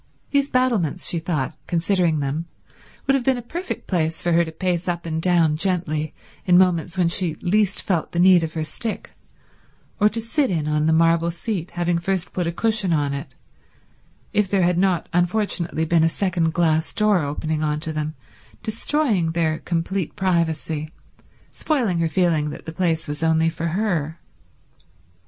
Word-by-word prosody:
These 280 0 +2
battlements, 225 - +1
she 170 - +1
thought, 160 -6 -2
considering 170 -2 +1
them, 145 +4 -3 0.6
would 270 - +3
have 270 -2 +1
been 260 0 +2
a - - -5
perfect 345 +10 -5
place 160 -3 -1
for 175 - +1
her 170 +1 +4
to 160 - -6
pace 180 +1 -2
up 170 -1 -2
and 160 -1 -2
down 170 -3 +3
gently 160 -4 -1 0.3
in 180 -1 +4
moments 180 -1 +2
when 180 -2 +3
she 170 -2 +1
least 195 +3 +1
felt 175 -5 -1
the - - -5
need 180 -1 +6
of 160 0 -4
her 160 - -1
stick, 210 +8 -4 0.9
or 210 +1 +5
to 230 - -4
sit 260 +5 0
in 160 -5 -1
on 150 0 +1
the - - +3
marble 165 +1 +3
seat, 175 0 -4
having 175 -1 +1
first 185 +1 -2
put 180 -2 -1
a - - 0
cushion 215 0 +1
on 145 -2 0
it, 140 +3 -6 1.0
if 210 -2 +2
there 195 -2 +2
had 175 0 +2
not 185 -4 +1
unfortunately 175 -2 0
been 165 0 +3
a 165 - +4
second 170 -2 0
glass 160 -1 +1
door 210 -3 +3
opening 155 +1 -2
on 150 -1 0
to 160 -1 -3
them, 155 0 -3 0.5
destroying 220 - 0
their 160 -2 0
complete 175 +1 -2
privacy, 160 -5 -1 0.6
spoiling 235 - 0
her 165 -1 +1
feeling 160 -3 +1
that - - -9
the 160 - -6
place 165 -2 0
was 150 +1 -4
only 160 0 +3
for 165 0 -4
her. 170 -4 -1
170 Hz, 175 wpm, -22 LUFS, 160-190 Hz, 1.0 s, need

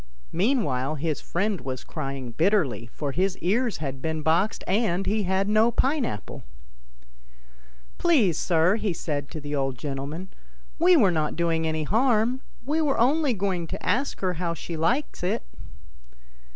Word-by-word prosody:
Meanwhile 160 - +1
his 155 0 -2
friend 200 +2 -1
was 130 0 -5
crying 135 -3 -5
bitterly, 150 - +1
for 145 -2 -3
his 190 +5 0
ears 225 +6 0
had 135 -3 -5
been 160 0 -2
boxed, 170 +7 +1
and 195 -2 +1
he 210 +3 +1
had 190 +1 +1
had - - -5
no 215 +2 +4
pine 265 +3 +1
apple. 105 - -6 0.9
" - - -28
Please, 250 - +4
sir," 170 +5 +3
he 210 -4 -1
said 145 -4 -3
to 155 - -6
the 145 0 -6
old 135 -3 -1
gentleman, 145 +7 -5 0.3
" - - -28
we 350 +1 +6
were 200 -10 +5
not 155 -3 0
doing 165 -1 +1
any 155 0 -1
harm; 235 - +2 0.2
we 305 +4 +1
were 290 -3 +1
only 280 +3 +3
going 185 -4 -1
to - - -6
ask 250 +10 0
her 185 -2 +1
how 170 -1 -1
she 170 - -6
liked 235 - 0
it." 180 - 0
175 Hz, 165 wpm, -26 LUFS, 145-220 Hz, 0.9 s, we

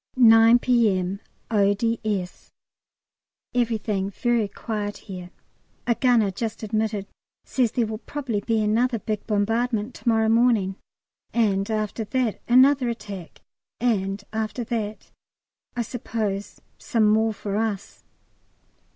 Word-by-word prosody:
9 225 -1 +7
P.M., 200 -7 +1 0.3
O.D.S. 205 -2 0 1.0
Everything 220 -5 0
very 235 +1 0
quiet 205 0 -4
here. 180 -3 -9 0.6
A 240 - +3
gunner 235 -5 +3
just 225 +3 -4
admitted 215 -1 -1 0.4
says 245 -3 0
there 240 - +1
will 215 0 -5
probably 255 -6 -3
be 220 0 +1
another 230 +3 +2
big 215 0 -4
bombardment 225 +2 0
to 240 - -2
morrow 220 -1 +3
morning, 225 -4 +3 0.6
and 200 -4 +2
after 215 0 -2
that 240 0 -1
another 255 +1 +5
attack, 200 -7 -7 0.4
and 200 -4 0
after 220 +2 -2
that 220 -2 -4 0.6
I 240 - 0
suppose 215 -4 -4 0.2
some 230 -7 +2
more 220 +1 +3
for 205 -1 -4
us. 215 -3 -3
220 Hz, 115 wpm, -24 LUFS, 205-235 Hz, 1.0 s, 9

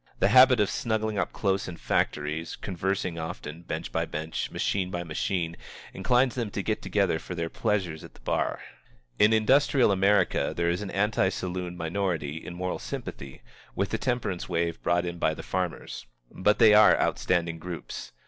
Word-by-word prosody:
The - - +3
habit 130 -1 +7
of 105 - +2
snuggling 110 -2 -1
up - - -1
close 95 -2 -1
in 90 -2 -7
factories, 75 +2 -1
conversing 95 -2 -2
often, 80 -1 -6
bench 80 -1 -5
by - - 0
bench, 80 +1 -4
machine 95 -2 -1
by 90 -1 -3
machine, 85 +1 -2 0.4
inclines 125 +1 +2
them 120 -4 -2
to 100 -1 -4
get 110 +1 -1
together 100 -6 +1
for 90 - -7
their 85 -1 -3
pleasures 95 -8 -1
at - - -13
the - - -17
bar. - - -1 0.6
In 105 +1 +6
industrial 130 +2 +4
America 100 +2 +2
there 85 0 +2
is 90 +3 -2
an 105 - -5
anti 100 -1 +1
saloon 90 -1 -4
minority 80 -3 -2
in 90 - -7
moral 90 +1 -3
sympathy 70 -1 -7 0.3
with - - 0
the - - -1
temperance 120 -9 -2
wave 85 -1 -1
brought 85 0 +1
in 85 0 -5
by 80 - +1
the - - -8
farmers. 90 -8 -4 0.2
But 105 +3 +2
they 110 -3 +7
are 105 0 +7
outstanding 85 -2 0
groups. 85 -9 -7
90 Hz, 175 wpm, -27 LUFS, 85-105 Hz, 0.6 s, habit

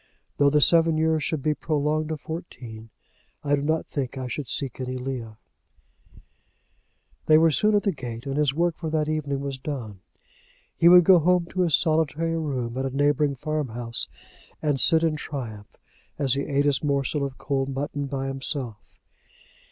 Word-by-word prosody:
"Though 145 0 +5
the 150 +1 +3
seven 165 0 +4
years 160 -1 +1
should 150 -2 -2
be 155 - +2
prolonged 155 0 -1
to 160 - -2
fourteen 125 -9 -8 0.5
I 145 0 +2
do 140 - -3
not 155 +2 0
think 135 -2 -4
I 130 -1 -4
should 130 +2 -5
seek 130 +1 -2
any 130 0 -4
Leah." 125 -4 -5 1.9
They 155 - +7
were 165 0 +5
soon 210 +7 +2
at 205 - +2
the 200 - +2
gate, 120 -6 -7
and 135 0 -3
his 150 -2 +2
work 170 +3 0
for 160 - -4
that 155 -1 0
evening 145 -3 -2
was 140 -1 -4
done. 125 -9 -6 0.8
He 170 - +5
would 180 0 +8
go 180 +1 +7
home 180 +2 +2
to 185 - -1
his 165 -5 +4
solitary 160 0 +1
room 130 -6 -3
at 135 - -1
a - - -1
neighbouring 145 0 +2
farm 155 +1 -2
house, 115 0 -2 0.5
and 145 -3 0
sit 160 +2 +5
in 160 -2 +1
triumph 115 -9 -7 0.4
as 135 -4 +2
he 140 +2 -2
eat 140 0 +1
his 145 0 +1
morsel 140 0 0
of 135 -2 -4
cold 135 -1 -2
mutton 140 +1 -3
by 135 -1 -3
himself. 135 -4 -5
145 Hz, 180 wpm, -25 LUFS, 135-155 Hz, 1.9 s, would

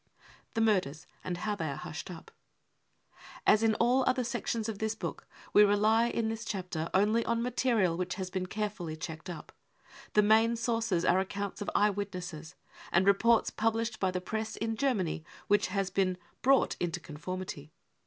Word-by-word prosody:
The 225 - +1
Murders 185 -9 +1 0.2
and 180 -1 -3
how 210 +4 -2
they 160 -6 -3
are 140 - -3
Hushed 155 +4 -7
up. 170 -3 -10 1.1
As 215 - +5
inwall 235 +4 +3
other 255 0 +2
sections 235 -2 -2
of 215 -3 -4
this 220 0 -1
book, - - -6 0.3
we 210 - +8
rely 215 +3 +4
in 230 -1 -1
'this 225 0 -3
chapter 180 -7 -3
only 215 +4 +3
bn 235 0 0
material 235 -8 +1
which 180 +1 -2
has 185 -1 -5
been 185 -1 -2
carefully 200 -5 -3
checked 160 +1 -7
up: 170 -3 -8 0.6
the 210 - +5
main 220 +2 +4
sources 225 -6 0
are 185 +1 +4
accounts 200 +1 -4
of 205 - -2
eyewitnesses, 185 -6 -1 0.4
and 175 +2 +3
reports 220 +4 +4
pub 225 +1 +1
lished 225 0 -2
by 190 - +2
the 185 0 -2
Press 220 +4 -4
in 225 0 -2
Germany 210 - 0 0.2
which 205 0 +3
has 195 0 -1
been 185 -1 +1
45 175 -1 -30
brought 270 +1 +4
into 175 -2 -2
conformity. 155 -1 -6
205 Hz, 175 wpm, -31 LUFS, 180-225 Hz, 1.1 s, we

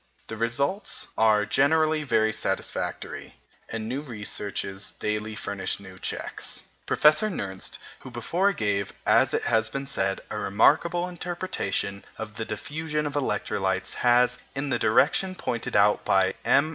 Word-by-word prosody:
The 110 - -6
results 140 - -1
are 110 -1 +4
generally 155 +5 +3
very 110 -6 +2
satisfactory, - - -3 0.3
and 110 -1 -4
new 130 +4 -2
researches 105 -5 -4
daily 105 0 -2
furnish 100 -2 -2
new 95 -2 -12
checks. - - -3 0.2
Professor 155 +8 +5
Nernst, 95 - -4 0.2
who - - -10
before 170 - +1
gave, 100 - -1
as - - +4
has 110 -1 +2
been 135 0 -4
said, 95 -8 -1
a 105 - -2
remarkable 160 - +3
interpretation 175 - -3
of 110 -1 -7
the 115 - -3
diffusion 150 +8 -3
of 145 - -3
electrolytes, 95 -9 -1
has, 125 0 +3 0.2
in 140 +1 -2
the - - +1
direction 160 - +3
pointed 120 -9 -3
out 105 0 +4
by 95 -1 +3
M. 150 +3 +4
115 Hz, 135 wpm, -26 LUFS, 105-150 Hz, 0.3 s, Professor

